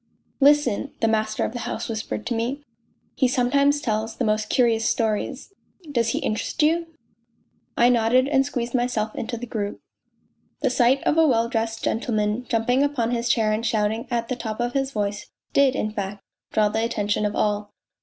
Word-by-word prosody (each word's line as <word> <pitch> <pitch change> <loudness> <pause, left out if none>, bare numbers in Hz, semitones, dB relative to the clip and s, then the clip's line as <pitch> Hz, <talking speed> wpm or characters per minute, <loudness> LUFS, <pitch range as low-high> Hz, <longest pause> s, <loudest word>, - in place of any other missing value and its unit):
" - - -43
Listen," 285 -3 +1
the 225 - +2
master 215 -1 0
of - - -4
the 245 - -4
house 230 - -4
whispered 220 -1 -4
to 240 - -1
me. 245 +6 -2 0.3
" - - -43
He 260 - +5
sometimes 280 +4 +2
tells 220 -3 -2
the 245 - -1
most 215 0 0
curious 230 -3 +2
stories.... 230 - -2 0.4
Does 235 -4 +1
he - - -1
interest 220 +8 -1
you? 330 +2 +2 0.5
" - - -43
I 240 - +5
nodded 245 +2 +3
and 275 -2 +3
squeezed 245 -4 -3
myself 240 -4 0
into 235 +1 -4
the 245 - -6
group. 210 -4 -4 0.8
The 265 -4 +1
sight 250 +2 +3
of 325 - +2
a 320 - +6
well 230 -4 +2
dressed 225 -1 -2
gentleman 220 +1 -1
jumping 240 +3 +2
upon 275 -5 0
his 240 0 -1
chair 225 -2 +2
and 215 +2 -1
shouting 220 +1 0
at 235 -2 -1
the 255 - -2
top 220 -2 -5
of 240 0 -1
his 270 -1 0
voice 205 -4 -3 0.2
did, 275 -2 +4
in 215 - -1
fact, 200 -1 -5 0.3
draw 215 -1 +3
the 220 +2 -1
attention 210 -3 -1
of 210 0 -1
all. 205 0 0
230 Hz, 195 wpm, -24 LUFS, 215-255 Hz, 0.8 s, a